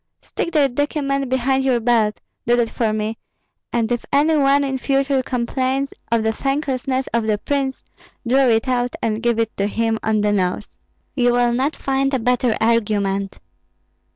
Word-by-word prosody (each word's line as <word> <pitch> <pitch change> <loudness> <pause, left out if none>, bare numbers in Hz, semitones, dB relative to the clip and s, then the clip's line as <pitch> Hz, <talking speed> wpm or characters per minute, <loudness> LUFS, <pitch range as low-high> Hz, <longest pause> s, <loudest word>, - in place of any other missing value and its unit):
"Stick 340 - -4
that 280 -5 +3
document 275 -1 -1
behind 260 +1 +1
your 255 -3 +2
belt, 225 -3 +1 0.3
do 240 - +4
that 235 -2 0
for 225 -3 0
me, 215 +1 -3 0.5
and 230 -1 0
if 240 - -1
any 300 +3 +3
one 280 -1 +3
in 265 -1 -2
future 275 0 +1
complains 260 +2 -2 0.2
of 230 -1 +2
the 220 - +1
thanklessness 270 0 -1
of 230 -2 0
the 215 -1 +2
prince, 270 +3 -2 0.4
draw 265 +2 +4
it 225 +1 +2
out 245 -1 0
and 220 -1 -1
give 235 -1 +1
it 225 -1 -1
to 200 - 0
him 225 +1 -1
on 215 -1 +1
the 210 0 +1
nose. 190 0 -2 0.3
You 245 -2 +2
will 245 0 +2
not 270 +5 0
find 270 0 0
a - - 0
better 245 -1 +1
argument." 205 -4 0
245 Hz, 175 wpm, -20 LUFS, 225-270 Hz, 0.5 s, do